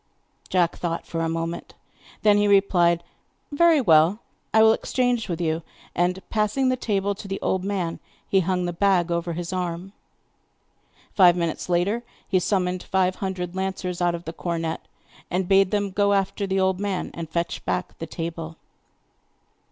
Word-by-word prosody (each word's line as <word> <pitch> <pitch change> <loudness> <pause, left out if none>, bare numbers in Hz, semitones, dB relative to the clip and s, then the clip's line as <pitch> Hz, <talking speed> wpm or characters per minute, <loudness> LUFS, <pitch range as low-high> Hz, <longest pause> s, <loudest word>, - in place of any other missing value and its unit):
Jack 175 -2 +1
thought 170 -1 -3
for 165 - -3
a 165 - 0
moment; 165 +1 -4 0.5
then 210 -1 +5
he 205 - +3
replied: 175 -4 +3 0.5
'Very 330 +1 +5
well, 165 - +5 0.3
I 220 0 +6
will 220 0 +7
exchange 245 -2 0
with 170 -1 -2
you.' 160 -1 0 0.3
And 180 +2 -1
passing 220 +5 +1
the 255 - +2
table 200 -5 -1
to 200 +1 -10
the 195 0 -3
old 190 -1 0
man, 190 -4 -2 0.3
he 195 - +3
hung 180 0 0
the 175 - -2
bag 180 -1 +2
over 170 0 -1
his 175 +2 -4
arm. 180 +1 -3 1.2
Five 180 -3 +6
minutes 170 0 -2
later 185 +7 +1 0.3
he 185 - +2
summoned 180 -1 0
five 185 -1 0
hundred 185 -2 -4
lancers 190 -2 -3
out 175 -1 +2
of 170 - -9
the 165 - -5
cornet 165 -2 -3 0.5
and 180 0 -1
bade 195 0 +5
them 205 -1 -1
go 200 +1 +2
after 195 +1 0
the 190 0 0
old 190 -1 +1
man 200 -2 -2
and 165 -2 -6
fetch 170 +1 -2
back 180 - -2
the 165 - -5
table. 165 0 -5
185 Hz, 165 wpm, -24 LUFS, 170-200 Hz, 1.2 s, will